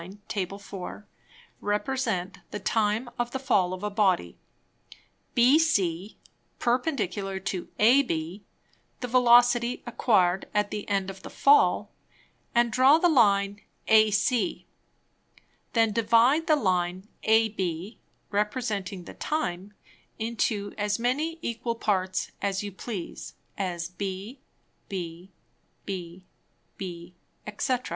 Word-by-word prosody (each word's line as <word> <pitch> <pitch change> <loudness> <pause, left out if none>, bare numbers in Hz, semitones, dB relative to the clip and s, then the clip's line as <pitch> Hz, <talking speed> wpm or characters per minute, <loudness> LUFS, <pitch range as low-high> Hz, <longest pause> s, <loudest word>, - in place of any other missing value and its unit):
Tab. 190 -4 -2
4._) 200 0 -8 0.6
represent 210 -4 -1
the - - -5
Time 215 +3 0
of 240 0 0
the 265 - -3
Fall 195 -9 +1
of 185 +1 -6
a 210 - -2
Body, 190 - +1 1.0
BC 220 - +3 0.4
perpendicular 225 - -1
to 190 -1 -4
AB, 205 - +2 0.6
the 250 - -2
Velocity 245 0 +4
acquired 195 -6 +2
at 210 0 +1
the 210 - -5
end 195 -1 0
of 190 0 -13
the - - -9
Fall, 210 -7 +4 0.6
and 235 0 +3
draw 260 +6 +6
the 350 - +3
Line 205 -7 +3 0.3
AC; 220 - +3 1.1
then 225 -2 +3
divide 235 - +3
the 310 - +5
Line 185 -5 0 0.2
AB 210 -4 +1 0.3
representing 205 -3 -2
the - - -10
Time, 195 - -3 0.4
into 220 -3 -2
as 205 0 0
many 285 +8 -1
equal 235 0 -2
Parts 190 -4 -1
as 195 0 -1
you 205 - -5
please, 195 -1 -7 0.2
as 175 -3 -3
b, 195 +6 -6 0.5
b, 175 -2 -6 0.6
b, 180 -2 -6 0.5
b, 175 -2 -8 0.3
_&c. 245 +4 -1
210 Hz, 110 wpm, -27 LUFS, 190-240 Hz, 1.1 s, draw